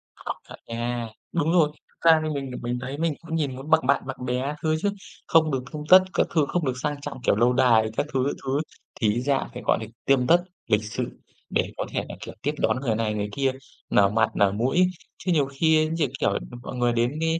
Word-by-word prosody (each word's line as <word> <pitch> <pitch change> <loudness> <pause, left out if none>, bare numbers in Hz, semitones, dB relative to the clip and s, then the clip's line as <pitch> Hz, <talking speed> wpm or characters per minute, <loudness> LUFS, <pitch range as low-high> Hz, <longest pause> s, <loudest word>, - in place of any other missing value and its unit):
Có - - -5 0.2
thể - - -8
nha, 120 0 -3 0.2
đúng 165 -1 +1
rồi, 165 -4 +4 0.2
thực 165 - +1
ra 160 - +5
thì 155 - -1
mình 140 -3 -3
thì 125 - -5
mình 120 +1 -2
thấy, 135 +3 -5
mình 165 0 0
cũng 165 -1 -5
nhìn 145 -5 -1
muốn 135 +4 -8
bằng 160 -4 +4
bạn 140 0 +3
bằng 130 -1 -5
bè 125 0 0
các 145 +2 -2
thứ 155 0 +2
chứ. 205 - +2 0.4
Không 160 -1 +4
được 130 -2 -1
tươm 150 -1 -5
tất 185 +1 +11
các - - +2
thứ, 155 -4 +2
không 175 -3 0
được 130 - +1
sang 145 -1 -2
trọng, 140 -3 -7
kiểu, - - +3
lâu 120 +3 +3
đài 115 -4 +4
các - - +1
thứ, 130 - +2
các 140 - -1
thứ, 135 +2 0 0.4
thì 105 -2 +3
ít 120 - -1
ra 135 +1 0
phải, 125 - -7
gọi - - +3
là, - - -4 0.2
tươm 130 -2 +3
tất 175 +1 +5 0.2
lịch 105 0 +2
sự 115 +3 -4 0.4
để - - 0
có - - -2
thể - - -2
là, - - -6
kiểu, - - -7
tiếp - - 0
đón - - +1
người 115 -5 0
này 110 -1 0
người 105 -1 -2
kia, 135 +3 +1 0.4
nở 100 -1 +5
mặt 110 +2 +2
nở 100 -1 +4
mũi. 130 - +2 0.3
Chứ 180 - -2
nhiều 150 -4 +3
khi, 155 +3 +2
như 165 -3 +1
kiểu 100 - +2
là, - - -1 0.2
mọi - - -6
người 120 -1 +2
đến 120 +5 0
cái 165 0 +1
135 Hz, 260 wpm, -25 LUFS, 120-155 Hz, 0.4 s, tất